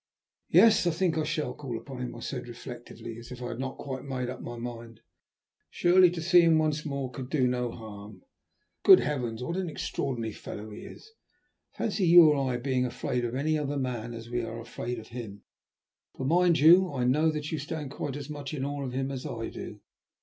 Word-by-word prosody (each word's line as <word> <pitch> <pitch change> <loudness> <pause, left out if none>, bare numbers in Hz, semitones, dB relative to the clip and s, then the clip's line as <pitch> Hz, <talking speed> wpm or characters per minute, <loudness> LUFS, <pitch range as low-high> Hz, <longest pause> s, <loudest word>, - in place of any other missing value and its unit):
"Yes, 220 -5 +6
I - - +5
think 170 0 0
I 160 - +1
shall 155 0 -2
call 135 -6 -5
upon 125 +3 -8
him," 125 - -5
I 115 - -9
said 125 0 -5
reflectively, 120 -1 -9
as 120 - -12
if 125 - -7
I 125 -1 -5
had 120 - -6
not 130 0 -4
quite 130 -2 -6
made 125 -2 -3
up 130 - -8
my 120 0 -7
mind. 115 -1 -8 0.7
"Surely 180 +1 +5
to 170 -2 -5
see 175 +1 +6
him 165 -1 +5
once 155 -1 +1
more 140 -3 -3
could 130 0 -7
do 140 -4 +2
no 125 -1 0
harm? 110 - -10 0.6
Good 380 -2 +9
heavens! 125 -5 -2
what 170 +7 -3
an 185 -2 -2
extraordinary 120 -6 -3
fellow 105 +1 -8
he 105 - -9
is! 440 - -12 0.7
Fancy 205 -4 0
you 165 -2 +9
or 135 -3 +1
I 120 - -1
being 130 0 0
afraid 125 0 -2
of 120 +1 -2
any 155 +3 +1
other 145 -1 -2
man 120 -3 -3
as 115 0 -8
we 120 0 -2
are 115 0 -5
afraid 120 +1 -5
of 110 - -10
him, 115 -5 -8 0.7
for 130 - -4
mind 170 +3 +4
you, 175 +4 +7
I 130 -3 -2
know 150 +6 +3
that 150 -1 -3
you 160 - -2
stand 150 -1 -5
quite 140 -1 -4
as 145 -1 -6
much 145 -1 -6
in 135 -2 -2
awe 145 0 -3
of 125 -2 -5
him 135 +1 -2
as 130 -2 -5
I 115 -1 -4
do. - - -8
135 Hz, 215 wpm, -28 LUFS, 120-155 Hz, 0.7 s, Good